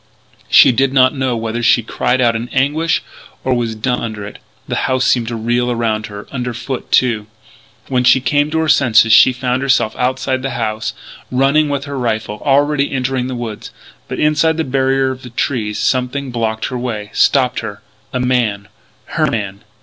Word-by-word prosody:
She -, -, +7 dB
did 135 Hz, +2 st, +1 dB
not 130 Hz, -1 st, +4 dB
know 130 Hz, -4 st, -1 dB
whether 115 Hz, +1 st, -3 dB
she 120 Hz, 0 st, +3 dB
cried 125 Hz, +3 st, 0 dB
out 115 Hz, -2 st, +3 dB
in 115 Hz, +2 st, -4 dB
anguish 150 Hz, +5 st, 0 dB, 0.4 s
or 130 Hz, -, +1 dB
was 120 Hz, -2 st, -1 dB
dumb 125 Hz, +3 st, -1 dB
under 110 Hz, -3 st, -5 dB
it. 100 Hz, -, -10 dB, 0.3 s
The -, -, -2 dB
house 130 Hz, 0 st, +1 dB
seemed 120 Hz, -3 st, +2 dB
to 120 Hz, -, -3 dB
reel 120 Hz, +2 st, 0 dB
around 115 Hz, -2 st, -1 dB
her; 100 Hz, -1 st, -9 dB
under 125 Hz, -2 st, -4 dB
foot 130 Hz, +2 st, -6 dB
too. 115 Hz, -5 st, +2 dB, 0.6 s
When 125 Hz, -2 st, 0 dB
she 125 Hz, -, +5 dB
came 145 Hz, +4 st, +1 dB
to 160 Hz, -, -2 dB
her 160 Hz, -, -1 dB
senses 115 Hz, -6 st, +4 dB
she 110 Hz, +3 st, +7 dB
found 125 Hz, 0 st, -2 dB
herself 135 Hz, -5 st, +1 dB
outside 130 Hz, +1 st, -1 dB
the 135 Hz, -, -2 dB
house, 110 Hz, -2 st, -2 dB, 0.4 s
running 140 Hz, +4 st, +2 dB
with 140 Hz, -1 st, -2 dB
her 140 Hz, -2 st, -5 dB
rifle, 110 Hz, -3 st, -2 dB
already 145 Hz, 0 st, +2 dB
entering 130 Hz, -1 st, -1 dB
the 130 Hz, -, -4 dB
woods. 115 Hz, -3 st, -6 dB, 0.4 s
But, -, -, -5 dB
inside 155 Hz, +1 st, +2 dB
the 160 Hz, -, 0 dB
barrier 135 Hz, -1 st, +1 dB
of 125 Hz, -2 st, -10 dB
trees, 110 Hz, -7 st, -1 dB
something 130 Hz, +1 st, -1 dB
blocked 110 Hz, -2 st, -2 dB
her 125 Hz, -, -4 dB
way, 110 Hz, -4 st, -4 dB
stopped 130 Hz, -2 st, +2 dB
her, 105 Hz, -3 st, -7 dB, 0.3 s
a 125 Hz, -, -2 dB
man 120 Hz, -6 st, 0 dB, 0.4 s
her -, -, 0 dB
man! 100 Hz, -3 st, -3 dB
125 Hz, 185 wpm, -16 LUFS, 115-135 Hz, 0.6 s, She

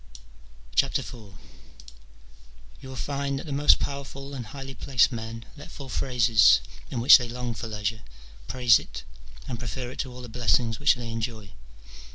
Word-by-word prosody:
IV. -, -, -4 dB, 1.7 s
You 130 Hz, -, -11 dB
will 130 Hz, -, -8 dB
find 140 Hz, +3 st, -2 dB
that 135 Hz, -, -7 dB
the 150 Hz, -, -7 dB
most 145 Hz, +1 st, +5 dB
powerful 140 Hz, 0 st, -6 dB
and 125 Hz, -5 st, -6 dB
highly 135 Hz, +3 st, -8 dB
placed 130 Hz, -1 st, +2 dB
men 115 Hz, 0 st, -6 dB
let 145 Hz, 0 st, -11 dB
fall 140 Hz, -2 st, -10 dB
phrases 110 Hz, -, +4 dB, 0.3 s
in 125 Hz, -, -3 dB
which 130 Hz, +3 st, +9 dB
they 120 Hz, -1 st, -5 dB
long 120 Hz, 0 st, -4 dB
for 115 Hz, -, -6 dB
leisure, 110 Hz, 0 st, -3 dB, 0.5 s
praise 125 Hz, -4 st, +4 dB
it, -, -, -9 dB, 0.4 s
and 120 Hz, -3 st, -5 dB
prefer 125 Hz, +1 st, -5 dB
it -, -, -12 dB
to 130 Hz, -, -3 dB
all 125 Hz, 0 st, -10 dB
the -, -, -7 dB
blessings 115 Hz, -1 st, +1 dB
which 145 Hz, -, +4 dB
they 120 Hz, -2 st, -6 dB
enjoy. 110 Hz, -4 st, -5 dB
125 Hz, 165 wpm, -26 LUFS, 115-135 Hz, 1.7 s, which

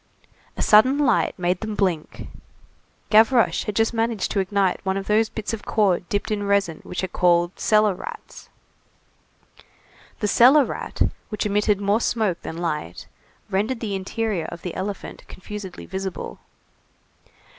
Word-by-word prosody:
A -, -, -1 dB
sudden 255 Hz, +6 st, +5 dB
light 270 Hz, -6 st, +2 dB
made 180 Hz, 0 st, 0 dB
them 215 Hz, -1 st, -4 dB
blink; 180 Hz, -7 st, -2 dB, 0.9 s
Gavroche 225 Hz, +3 st, +4 dB
had 210 Hz, -, -4 dB
just 225 Hz, +2 st, +2 dB
managed 225 Hz, -2 st, -1 dB
to 200 Hz, -, 0 dB
ignite 195 Hz, -1 st, 0 dB
one 190 Hz, 0 st, -1 dB
of 195 Hz, -, -4 dB
those 215 Hz, +1 st, +2 dB
bits 220 Hz, +1 st, -5 dB
of 220 Hz, -, -5 dB
cord 190 Hz, -5 st, +1 dB
dipped 205 Hz, +1 st, -2 dB
in 210 Hz, -1 st, -1 dB
resin 200 Hz, -5 st, +1 dB
which 180 Hz, -, -5 dB
are -, -, 0 dB
called 175 Hz, 0 st, +1 dB
cellar 215 Hz, -2 st, +3 dB
rats. 460 Hz, -, -10 dB, 1.7 s
The 210 Hz, -, 0 dB
cellar 260 Hz, +7 st, +6 dB
rat, -, -, -2 dB, 0.3 s
which 210 Hz, -1 st, -3 dB
emitted 210 Hz, 0 st, +1 dB
more 205 Hz, +3 st, +1 dB
smoke 215 Hz, -8 st, 0 dB
than 160 Hz, -, -7 dB
light, 150 Hz, -, -4 dB, 0.5 s
rendered 215 Hz, +6 st, 0 dB
the 215 Hz, -4 st, -3 dB
interior 195 Hz, -1 st, -2 dB
of 170 Hz, -, -8 dB
the 180 Hz, -, -4 dB
elephant 195 Hz, +1 st, -6 dB
confusedly 195 Hz, -1 st, -8 dB
visible. 190 Hz, -1 st, -5 dB
205 Hz, 145 wpm, -23 LUFS, 185-220 Hz, 1.7 s, cellar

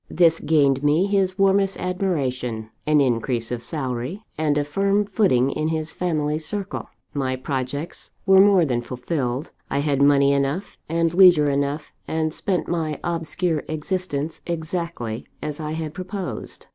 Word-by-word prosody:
This 165 Hz, -1 st, +4 dB
gained 140 Hz, -4 st, +3 dB
me 150 Hz, +5 st, +3 dB
his 195 Hz, -2 st, +1 dB
warmest 195 Hz, 0 st, +3 dB
admiration, 130 Hz, -, -2 dB, 0.2 s
an 150 Hz, -1 st, +5 dB
increase 120 Hz, -2 st, 0 dB
of 120 Hz, -1 st, -2 dB
salary, 135 Hz, -, -4 dB
and 150 Hz, -2 st, +1 dB
a 145 Hz, -, +2 dB
firm 195 Hz, +7 st, +1 dB
footing 185 Hz, -, +2 dB
in 155 Hz, +2 st, -1 dB
his 160 Hz, 0 st, -2 dB
family 155 Hz, -4 st, -1 dB
circle. 200 Hz, +5 st, -4 dB, 0.2 s
My 130 Hz, -3 st, -1 dB
projects 135 Hz, +4 st, -4 dB, 0.2 s
were 190 Hz, -1 st, +7 dB
more 195 Hz, -4 st, +5 dB
than 120 Hz, -4 st, 0 dB
fulfilled: 125 Hz, +2 st, -3 dB, 0.2 s
I -, -, -1 dB
had 140 Hz, -1 st, +1 dB
money 140 Hz, 0 st, +5 dB
enough, 140 Hz, +7 st, -1 dB
and 165 Hz, 0 st, +1 dB
leisure 175 Hz, -6 st, +7 dB
enough; 140 Hz, +2 st, -2 dB
and 160 Hz, -1 st, -1 dB
spent 185 Hz, 0 st, -1 dB
my 160 Hz, -3 st, -2 dB
obscure 165 Hz, -1 st, -1 dB
existence 155 Hz, -1 st, -3 dB
exactly 165 Hz, -9 st, -4 dB
as 150 Hz, 0 st, -5 dB
I 155 Hz, 0 st, -3 dB
had 160 Hz, -1 st, -4 dB
proposed. 185 Hz, 0 st, -6 dB
155 Hz, 145 wpm, -23 LUFS, 140-180 Hz, 0.2 s, were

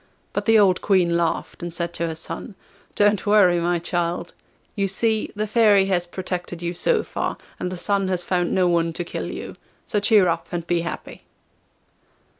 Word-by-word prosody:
But -, -, -2 dB
the 225 Hz, -1 st, +5 dB
old 195 Hz, -3 st, +4 dB
Queen 180 Hz, -4 st, +2 dB
laughed, 170 Hz, +1 st, -1 dB
and 175 Hz, 0 st, -4 dB
said 170 Hz, +1 st, -3 dB
to 170 Hz, -, -2 dB
her 160 Hz, -, -4 dB
son: 190 Hz, +6 st, -7 dB, 0.4 s
'Don't 205 Hz, 0 st, +2 dB
worry, 195 Hz, -4 st, +5 dB
my 175 Hz, +1 st, +1 dB
child; 170 Hz, 0 st, -2 dB, 0.4 s
you 200 Hz, -2 st, 0 dB
see, 220 Hz, +3 st, 0 dB
the 210 Hz, +1 st, -1 dB
Fairy 210 Hz, -3 st, +4 dB
has 180 Hz, -2 st, +1 dB
protected 175 Hz, -1 st, -5 dB
you 170 Hz, 0 st, -2 dB
so 455 Hz, -, +1 dB
far, -, -, -3 dB, 0.2 s
and 180 Hz, -, -3 dB
the 185 Hz, -, -5 dB
Sun 195 Hz, +2 st, 0 dB
has 180 Hz, -2 st, -1 dB
found 175 Hz, -1 st, 0 dB
no 185 Hz, -1 st, +3 dB
one 170 Hz, -1 st, +1 dB
to 175 Hz, -, -3 dB
kill 170 Hz, -, -5 dB
you. -, -, -7 dB, 0.3 s
So 210 Hz, -, 0 dB
cheer 205 Hz, -2 st, +4 dB
up 170 Hz, -, -1 dB
and 175 Hz, -2 st, -3 dB
be 175 Hz, -1 st, +1 dB
happy. 170 Hz, 0 st, -6 dB
180 Hz, 190 wpm, -23 LUFS, 170-205 Hz, 0.4 s, the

